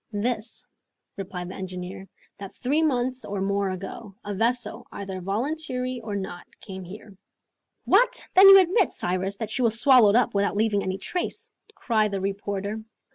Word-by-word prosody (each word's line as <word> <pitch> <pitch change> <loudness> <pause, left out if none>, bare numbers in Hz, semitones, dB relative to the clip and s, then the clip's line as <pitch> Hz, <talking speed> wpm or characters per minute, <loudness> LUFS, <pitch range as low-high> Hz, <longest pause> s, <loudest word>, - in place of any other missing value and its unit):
"This," 215 +1 -3 0.5
replied 180 -2 -6
the - - -7
engineer, 185 0 -7 0.3
"that 195 -1 -9
three 285 +5 0
months 255 -4 0
or 200 -1 -4
more 200 0 0
ago, 195 +2 -7
a 205 -1 -4
vessel, 240 +2 -1
either 195 -2 -6
voluntarily 255 - -3
or 215 -2 -5
not, 190 -3 -6
came 190 -2 -8
here." 195 +2 -11 0.7
"What! - - +3
then 390 +1 +9
you 390 - +11
admit, 375 +3 +3
Cyrus, 185 +2 -2
that 220 0 -4
she 255 - 0
was 230 -2 +2
swallowed 240 -6 +6
up 245 0 +3
without 200 0 0
leaving 210 -2 +2
any 190 0 -3
trace?" 355 - -4 0.2
cried 220 - +1
the 200 -1 -3
reporter. 200 +2 -3
205 Hz, 160 wpm, -25 LUFS, 195-250 Hz, 0.7 s, you